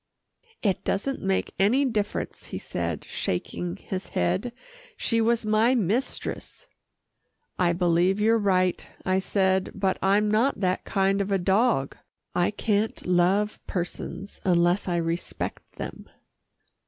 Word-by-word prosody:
"It 195 -5 +1
doesn't 265 +8 -1
make 190 0 0
any 240 +9 +4
difference," 210 -5 -2
he - - -5
said, - - -3
shaking 90 0 -3
his 185 - -5
head, 185 - 0 0.5
"she 230 -1 +1
was 230 0 +2
my 220 +4 +3
mistress." 240 - -2 0.9
"I 175 -1 +3
believe 175 +2 +2
you're 225 +2 +4
right," 185 -3 +2 0.2
I 185 0 +2
said, 190 -1 +1
"but 195 -1 0
I'm 205 +2 +3
not 230 +4 +2
that 185 -1 0
kind 195 0 +1
of 200 0 -2
a 195 - +3
dog. 190 - +2 0.4
I 175 - +2
can't 210 0 -1
love 185 +4 +2
persons 185 +2 -5
unless 175 +1 +3
I 175 - 0
respect 170 0 -3
them." - - -7
195 Hz, 130 wpm, -26 LUFS, 180-215 Hz, 0.9 s, any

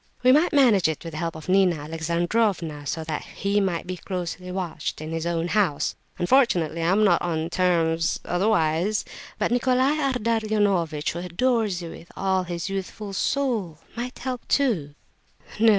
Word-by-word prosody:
We 255 - +7
might 305 +6 +4
manage 245 - +5
it 160 -2 -3
with 165 - -6
the 155 - -6
help 165 -1 -2
of 160 - -9
Nina 185 -2 +4
Alexandrovna, 165 +1 -1
so 160 +3 -2
that 155 -1 -3
he 200 +1 -1
might 180 -4 -1
be 185 0 -5
closely 180 0 -5
watched 175 -4 -4
in 155 +1 -6
his 165 +1 -2
own 170 0 -1
house. 190 -9 +1 0.2
Unfortunately 175 - +2
I 165 - +1
am 195 +4 +3
not 190 -5 +4
on 165 -1 -2
terms... 165 -3 +1
otherwise... 180 0 +1 0.3
but - - 0
Nicolai 255 +4 +2
Ardalionovitch, 215 - +1
who 170 - -5
adores 195 +1 0
you 165 - -6
with 170 - -12
all 190 -1 +1
his 170 0 -4
youthful 195 +1 -5
soul, 220 - -1 0.2
might 245 +2 -5
help, 255 -2 -5
too." 185 - +1 0.6
"No, 225 - +3
no! - - +9
180 Hz, 165 wpm, -25 LUFS, 165-220 Hz, 0.6 s, no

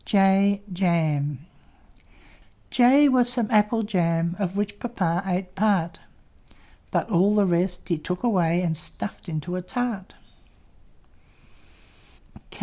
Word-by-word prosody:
J 195 0 +3
J 155 -6 0 1.7
was 250 -2 +3
some 240 -3 -2
Apple 215 +1 +2
Jam, 170 -4 0
Of 195 -1 -2
which 205 0 -3
Papa 185 -8 -1
ate 185 0 -2
part; 190 -4 0 0.9
But - - -1
all 195 +3 +3
the 205 -1 +4
rest 180 0 -1
he 170 -4 -1
took 180 +6 -5
away 180 -6 +1
And 165 -2 -1
stuffed 175 +3 -4
into 160 +3 -4
a 185 - -3
tart. 220 -1 -4
185 Hz, 110 wpm, -24 LUFS, 170-205 Hz, 1.7 s, the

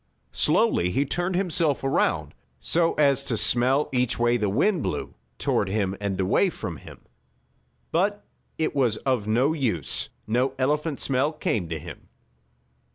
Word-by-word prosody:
Slowly 220 - +2
he 135 +10 0
turned 175 +5 -2
himself 170 -7 0
around, 135 - 0 0.3
so 165 - +1
as 140 -2 +3
to 115 - +1
smell 130 +6 +3
each 125 -1 +1
way 120 0 +2
the 105 -4 0
wind 180 - +2
blew, - - -3 0.2
toward 100 - 0
him 100 -2 -1
and 100 -2 -2 0.3
from 85 - -6
him. - - -13 0.9
But 200 +5 0 0.3
it 160 - -1
was 120 -6 +2
of 125 -6 0
no 125 +8 +2
use. 115 - -2 0.2
No 125 +4 0
elephant 150 +3 0
smell 135 +3 +1
came 110 - -2
to 80 - -3
him. 75 - -11
130 Hz, 145 wpm, -25 LUFS, 110-155 Hz, 0.9 s, as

